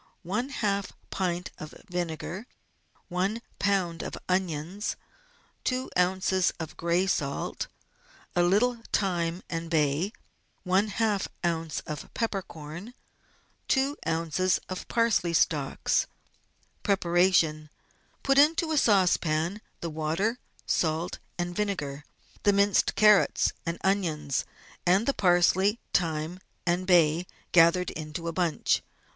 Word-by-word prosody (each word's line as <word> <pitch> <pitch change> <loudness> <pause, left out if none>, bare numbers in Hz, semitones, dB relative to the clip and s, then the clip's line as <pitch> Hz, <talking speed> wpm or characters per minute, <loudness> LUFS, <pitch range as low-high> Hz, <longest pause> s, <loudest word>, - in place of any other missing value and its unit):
\ - - -31 1.1
pint 180 -1 -2
of 155 - -8
vinegar. 175 +4 -4 0.6
i - - -9 0.5
lb. 185 -4 +1
of - - -5
onions. 185 +1 -1 0.7
2 255 0 -1
oz. 185 0 +2
of 160 -2 -6
gray 170 +2 +1
salt. 140 -7 -2 0.7
A 175 - +4
little 215 +7 +3
thyme 175 -3 0
and 165 0 -4
bay. 155 +4 +1 0.3
\ - - -42
oz. 205 +2 +1 0.6
of 150 -2 -7
peppercorn.^. 190 -2 -4 0.7
2 275 +1 +2
oz. 165 +3 +1
of 185 - -6
parsley 220 -7 +2
stalics. 150 -4 +1 0.7
Preparation. 175 -5 +2 0.3
— - - -38
Put 275 0 +4
into 320 +2 +4
a 305 - +4
saucepan 180 -3 +2 0.2
the 170 - -3
water, 165 +10 -1 0.3
salt, 160 +1 0 0.2
and 175 0 -3
vinegar, 150 -9 -2 0.4
the 205 - +4
minced 200 0 +3
carrots 210 -2 +5 0.2
and 170 0 -1
onions, 160 -8 0 0.4
and 185 +5 +3
the 275 - +2
parsley, 190 +3 +3
thyme, 160 0 0 0.3
and 180 +1 0
bay, 170 -1 +4 0.2
gathered 175 +1 +5
into 155 +1 -6
a 165 - -2
bunch. 175 -3 +1
180 Hz, 110 wpm, -28 LUFS, 165-200 Hz, 1.1 s, carrots